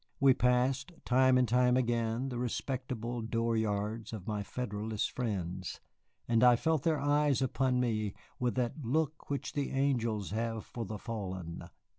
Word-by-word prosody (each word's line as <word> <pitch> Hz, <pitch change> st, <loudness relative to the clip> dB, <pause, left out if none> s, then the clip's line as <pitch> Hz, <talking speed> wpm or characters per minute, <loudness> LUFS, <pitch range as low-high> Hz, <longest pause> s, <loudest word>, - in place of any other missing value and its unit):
We 135 Hz, -1 st, +6 dB
passed 125 Hz, +5 st, +1 dB
time 130 Hz, +1 st, +5 dB
and 125 Hz, -1 st, +3 dB
time 125 Hz, +1 st, +4 dB
again 120 Hz, +1 st, 0 dB
the 120 Hz, -2 st, -4 dB
respectable 125 Hz, -1 st, -3 dB
door 115 Hz, +1 st, 0 dB
yards 110 Hz, +1 st, -1 dB
of 100 Hz, -5 st, -6 dB
my 105 Hz, -2 st, -2 dB
Federalist 105 Hz, -1 st, -3 dB
friends, 95 Hz, -6 st, -3 dB, 0.5 s
and 115 Hz, 0 st, +3 dB
I 125 Hz, -1 st, +8 dB
felt 160 Hz, +4 st, +1 dB
their 160 Hz, -1 st, +1 dB
eyes 145 Hz, -1 st, +3 dB
upon 130 Hz, -1 st, +1 dB
me 110 Hz, -5 st, 0 dB, 0.2 s
with 125 Hz, -1 st, 0 dB
that 125 Hz, +4 st, -1 dB
look 155 Hz, +5 st, -1 dB
which 140 Hz, -1 st, -3 dB
the 145 Hz, -2 st, -1 dB
angels 120 Hz, -7 st, 0 dB
have 115 Hz, 0 st, -2 dB
for 115 Hz, -2 st, -5 dB
the 105 Hz, +1 st, -5 dB
fallen. 95 Hz, -7 st, -5 dB
120 Hz, 155 wpm, -32 LUFS, 110-130 Hz, 0.5 s, I